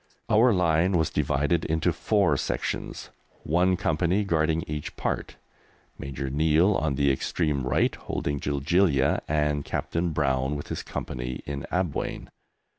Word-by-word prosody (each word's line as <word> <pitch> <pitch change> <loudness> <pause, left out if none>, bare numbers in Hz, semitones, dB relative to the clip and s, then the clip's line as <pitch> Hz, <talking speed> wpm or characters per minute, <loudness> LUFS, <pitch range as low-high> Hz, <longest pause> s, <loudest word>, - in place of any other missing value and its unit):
Our 115 +3 +6
line 90 -1 +2
was 80 -3 +1
divided 75 +5 +1
into 80 0 +1
four - - +2
sections, - - -3 0.3
one 90 +3 +2
company 90 +5 +1
guarding 80 -3 +1
each 75 -1 -5
part, - - -3 0.6
Major 70 0 -5
Neill 80 +7 +3
on 80 -6 0
the 70 0 +3
extreme 70 -1 -1
right - - +2
holding 70 0 -3
Jiljilia, 70 +1 +2
and 75 -1 0
Captain 85 +4 -2
Brown 70 -2 0
with 75 - -6
his - - -3
Company 60 0 -5
in 70 -1 -5
Abwein. 90 -4 -2
75 Hz, 130 wpm, -26 LUFS, 70-85 Hz, 0.6 s, Our